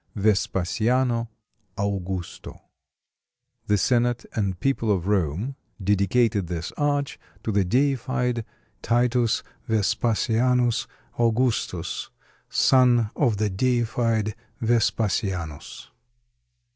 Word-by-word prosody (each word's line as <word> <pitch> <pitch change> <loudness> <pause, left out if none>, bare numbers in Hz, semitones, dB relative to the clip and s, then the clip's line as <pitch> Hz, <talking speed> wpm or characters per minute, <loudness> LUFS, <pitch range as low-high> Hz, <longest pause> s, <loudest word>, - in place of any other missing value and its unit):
VESPASIANO 115 +4 +1 0.5
AUGUSTO 95 -3 -4 1.1
(The 105 - +3
senate 120 +3 +1
and 95 -4 -1
people 135 -5 +1
of 90 -4 0
Rome 100 - 0 0.2
(dedicated 100 +1 +2
this 85 -1 -4
arch) 145 -1 -1 0.2
to 110 - -1
the 100 -1 +2
deified 125 +1 0 0.4
Titus 120 0 +1 0.3
Vespasianus 115 +3 +1 0.3
Augustus, 120 +1 0 0.4
son 120 -4 +4
of 120 -8 +2
the 105 -1 0
deified 115 -1 0 0.3
Vespasianus.) 100 -8 -1
115 Hz, 80 wpm, -24 LUFS, 100-125 Hz, 1.1 s, son